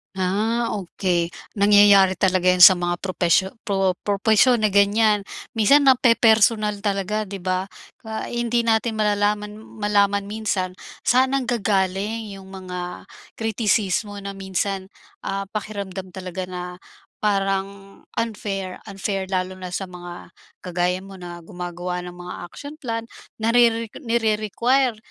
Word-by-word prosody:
Ah, 215 +6 0
okey. 175 -3 -1 0.2
Nangyayari 200 -2 +6
talaga 185 -1 +3
yun 180 - 0
sa 185 +1 +10
mga 175 0 -2
propesyo 185 +1 +1
pro 195 -3 +1
propesyon 220 +4 +3
na 215 - +3
ganyan, 205 +1 +3 0.3
minsan 275 +6 +5
nape-personal 220 -4 +4
talaga 205 +1 -1
'di 195 -1 -7
ba? 185 +1 -1 0.4
Ah, 220 0 -5
hindi 240 0 0
natin 225 -1 +1
malalaman 210 0 0 0.2
malaman 200 -1 +2
minsan 205 -4 -2 0.3
saan 260 +2 +4
nanggagaling 215 -4 0
yung 190 0 -12
mga 180 -2 -7 0.3
kritisismo 215 -2 0
na 200 0 -7
minsan, 190 0 -3 0.3
ah, 195 0 -3
pakiramdam 195 -3 -6
talaga 185 0 -6
na 180 -1 -6 0.6
parang 195 -1 -2 0.2
unfair 200 -4 -4
unfair 195 -1 -3
lalo 185 0 -1
na 185 -1 -8
sa 190 +1 -3
mga 175 -1 -10 0.3
kagaya 180 0 -1
mo 195 0 -11
na 175 -1 -9
gumagawa 180 0 -5
ng 180 - -7
mga 180 0 -7 0.2
action 285 +1 -9
plan 230 -2 -3 0.3
narere 230 0 +3 0.2
nire-require 235 +2 +1
200 Hz, 120 wpm, -22 LUFS, 185-220 Hz, 0.6 s, sa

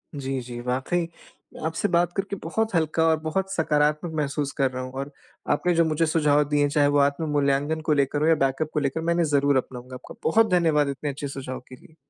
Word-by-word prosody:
जी, 135 -1 -3
जी। 120 0 -8
वाक़ई 130 +8 -1 0.6
आपसे 165 +5 -1
बात 175 -1 +2
करके 195 +1 -2
बहुत 220 +7 -1
हल्का 160 0 +1
और 160 -1 +3
बहुत 185 +5 -2
सकारात्मक 150 0 +1
महसूस 145 -1 -1
कर 135 -2 +2
रहा 130 0 -4
हूँ। 130 - -7
और 140 +1 -7 0.4
आपने 180 - +2
जो 165 0 +4
मुझे 160 +1 +1
सुझाव 150 -2 +3
दिए 145 -1 +2
हैं 145 - +3
चाहे 145 0 +3
वो 145 0 +2
आत्म 140 +3 +1
मूल्यांकन 145 +2 +1
को 155 0 +1
लेकर 145 0 +1
हो 155 - +3
या 165 - +5
बैकअप 135 +2 0
को 150 - +1
लेकर, 140 +2 -1
मैं 170 +1 +1
इन्हें 170 -1 +2
ज़रूर 140 -2 +2
अपनाऊँगा। 125 0 -5
आपका 125 - -11
बहुत 220 +5 +4
धन्यवाद 160 -5 +3
इतने 140 +2 -3
अच्छे 140 +1 -5
सुझाव 135 -2 -6
के 130 - -10
लिए। 155 +4 -20
150 Hz, 225 wpm, -25 LUFS, 140-160 Hz, 0.6 s, या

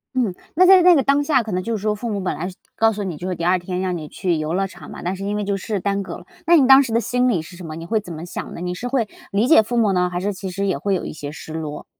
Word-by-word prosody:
嗯， 225 -8 0 0.2
那 370 +4 +5
在 375 -2 +8
那 360 -1 +8
个 275 - +4
当 280 +2 +2
下， 285 -4 +3
可 220 -2 -6
能 185 0 -1
就 230 +2 -2
是 205 - -5
说 210 0 0
父 235 +3 -5
母 200 - -2
本 185 - -2
来 175 - -3
是 185 - -8 0.2
告 225 0 +3
诉 205 0 -4
你， 175 -5 -4
就 180 - -5
是 185 - -1
第 170 - -6
2 185 +1 +4
天 180 0 -4
让 185 -2 -1
你 155 -2 -7
去 175 +3 -1
游 155 +2 -2
乐 195 +1 0
场 175 -5 -12
嘛， - - -8
但 180 +2 -2
是 195 - -6
因 205 +1 -1
为 210 - -1
就 200 0 -1
是 205 +1 -3
耽 200 +1 -1
搁 - - -7
了。 - - -14 0.2
那 340 +1 +6
你 270 -5 +5
当 270 +1 +8
时 240 - -5
的 230 - +4
心 250 +1 +1
理 190 -10 +1
是 175 +3 -12
什 175 - -9
么？ 155 - -6
你 165 - -7
会 220 -1 +1
怎 180 -4 -9
么 160 +1 -7
想 175 - -6
呢？ - - -8
你 180 0 -3
是 245 +7 -5
会 245 -4 0 0.2
理 210 +5 +2
解 275 -6 +7
父 240 +3 -4
母 225 -4 +3
呢， 180 -1 +1
还 175 - -2
是 200 +3 -1
其 190 -1 -6
实 200 +2 -2
也 190 - 0
会 200 -1 -1
有 185 - -1
一 - - -5
些 145 -1 -7
失 160 - -10
落？ 150 -2 -5
195 Hz, 375 characters per minute, -21 LUFS, 180-230 Hz, 0.2 s, 在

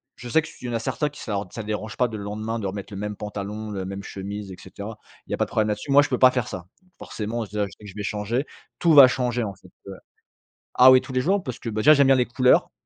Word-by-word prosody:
je 120 - -9
sais 160 - +4
que - - -8
s - - -15
il - - -8
y - - -4
en - - -4
a 115 - 0
certains 150 +6 -2
qui 145 - -13
sar 100 -3 -3
que - - -24
ça 110 - -5
dérange 110 +1 -4
pas 125 - +3
de 110 -1 -7
le 100 - -7
lendemain 110 +3 -4
de 100 - -3
remettre 100 +2 -6
le 100 - -6
même 105 0 -4
pantalon, 105 +1 -6
la 95 -2 -4
même 100 +1 -6
chemise, 100 +1 -7
et - - -8
cetera, 105 +2 -9 0.3
il - - -14
y - - 0
a - - -1
pas - - +1
de - - -15
problème 110 -1 +1
là-dessus. 105 +7 -3
Moi, 140 +1 +7
je - - -3
peux 125 - -1
pas 130 - +8
faire 125 -3 -2
ça. 90 -1 -7 0.2
Donc 185 - -31
forcément, 115 +2 -4
déjà, 105 0 -2
je 95 - -10
sais 105 - -17
que - - -9
je 95 - -13
vais 105 - -5
changer. 110 +7 -2 0.3
Tout 170 -2 +4
va 140 -3 +10
changer, 125 -1 -1
en 100 -3 -4
fait, 95 - -19 0.2
heu 95 - -7 0.8
Ah 130 +1 +8
oui, 130 0 +6
tous - - -10
les 130 - +1
jours, 190 +7 +1
parce 125 - -6
que, - - -9
bah 110 -1 -2
déjà, 155 +5 +7
j'aime 140 -2 +4
bien 135 - +6
les 125 - +2
couleurs. 125 +1 +3
110 Hz, 320 wpm, -24 LUFS, 105-125 Hz, 0.8 s, va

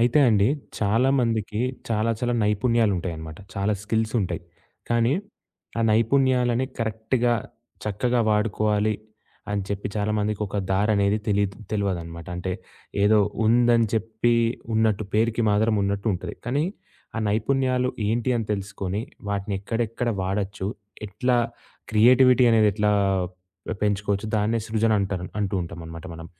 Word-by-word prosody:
అయితే 120 +4 +4
అండి, 105 -1 +4 0.3
చాలా 110 +5 +2
మందికి 110 -2 -1 0.3
చాలా, 110 0 +1
చాలా 120 -1 0
నైపుణ్యాలుంటాయన్నమాట. 100 -8 0 0.2
చాలా 100 +2 0
స్కిల్స్ 110 +1 -1
ఉంటాయి. 90 -3 -3 0.5
కానీ, 120 +1 +2 0.7
ఆ - - +1
నైపుణ్యాలని 125 +2 +3
కరెక్ట్‌గా 115 +2 0 0.5
చక్కగా 120 +4 0
వాడుకోవాలి 105 0 +1 0.6
అని 100 -1 0
చెప్పి 100 0 -3
చాలామందికొక 105 -1 -1
దారనేది 100 +1 +2
తెలీదు 100 -1 +1
తెలవదనమాట. 85 -6 -3
అంటే, 90 +1 -3 0.5
ఏదో 105 +1 +5 0.3
ఉందని 120 0 +4
చెప్పి 110 +2 +1 0.4
ఉన్నట్టు 110 -1 +2
పేరుకి 115 +1 +2
మాత్రం 110 +2 +3
ఉన్నట్టుంటుంది. 100 -1 -2
కానీ, 140 +5 +1 0.5
ఆ - - 0
నైపుణ్యాలు 125 +3 +1 0.2
ఏంటి 115 +3 0
అని 115 -2 -2
తెలుసుకొని, 100 0 -3 0.3
వాటినెక్కడెక్కడ 105 +4 -2
వాడచ్చు? 95 0 -2 0.4
ఎట్లా 125 +5 0 0.6
క్రియేటివిటీ 125 +3 +6
అనేది 110 -2 +5
ఎట్లా 105 +1 +1 0.9
పెంచుకోవచ్చు? 100 0 0
దాన్నే 110 +2 +1
సృజన 110 0 +2
అంటారు 95 -2 -2 0.2
అంటూ 100 -1 -1
ఉంటాం 85 0 -8
అన్నమాట 80 +2 -8
మనం. 80 0 -9
105 Hz, 115 wpm, -24 LUFS, 100-115 Hz, 0.9 s, క్రియేటివిటీ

